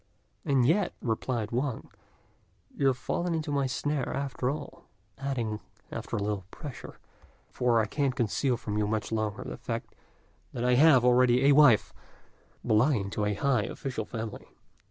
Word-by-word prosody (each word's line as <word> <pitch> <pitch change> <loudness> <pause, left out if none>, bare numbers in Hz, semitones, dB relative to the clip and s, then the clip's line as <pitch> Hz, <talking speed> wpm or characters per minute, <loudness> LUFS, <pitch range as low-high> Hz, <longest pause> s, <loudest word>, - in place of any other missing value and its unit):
"And 135 -3 +2
yet," 175 +6 +2
replied 115 -1 -2
Wang, 125 0 -2 0.8
"you 140 - +2
have 130 -2 +2
fallen 175 +6 -2
into 155 -2 -3
my 140 -2 +1
snare 145 +1 -2
after 135 -2 -2
all;" 145 +1 -6 0.3
adding, 120 -6 -2 0.3
after - - -5
a 100 - -1
little 105 -2 -2
pressure, 145 +1 -9 0.5
"for 120 -2 +2
I 110 - +2
can't 135 +3 -1
conceal 125 +2 0
from 105 -1 -3
you 105 - +1
much 110 +1 -2
longer 110 -2 -2
the - - -7
fact - - -5 0.6
that 120 - -3
I 125 - +4
have 130 -2 +6
already 125 +1 +4
a 145 - +7
wife, 140 -7 +5 0.7
belonging 110 -2 +2
to 105 - -1
a 105 0 0
high 135 +4 +1
official 125 -5 -4
family." 110 -2 -6
125 Hz, 155 wpm, -28 LUFS, 110-140 Hz, 0.8 s, a